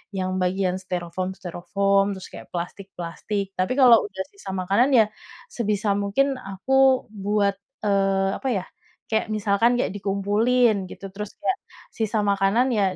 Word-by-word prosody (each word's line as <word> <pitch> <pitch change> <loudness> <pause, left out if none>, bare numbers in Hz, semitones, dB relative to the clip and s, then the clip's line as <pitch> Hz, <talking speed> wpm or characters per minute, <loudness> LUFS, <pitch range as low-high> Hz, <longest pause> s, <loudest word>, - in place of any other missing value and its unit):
yang 185 0 -1
bagian 185 0 +1
styrofoam-styrofoam, 185 +2 -1
terus 190 - -9
kayak - - -10
plastik-plastik 185 +2 -4
tapi 185 +7 +1
kalau 245 -4 +8
udah 190 -2 -6
sisa 400 - -11
makanan 195 +7 +2
ya 225 -4 +7 0.4
sebisa 210 -2 0
mungkin 210 +8 +1
aku 195 +6 -5 0.4
buat, 200 -1 0 0.3
eee, 195 -1 +2
apa 270 - -3
ya, 190 -4 -1 0.5
kayak 220 - +1
misalkan 215 +3 +2
kayak 245 - 0
dikumpulin 205 +2 +1
gitu, 195 +1 -9
terus 210 +1 -7
kayak 380 - +1 0.3
sisa 220 -1 -1
makanan 200 +6 +2
ya 195 -5 +1
200 Hz, 135 wpm, -24 LUFS, 190-215 Hz, 0.5 s, kalau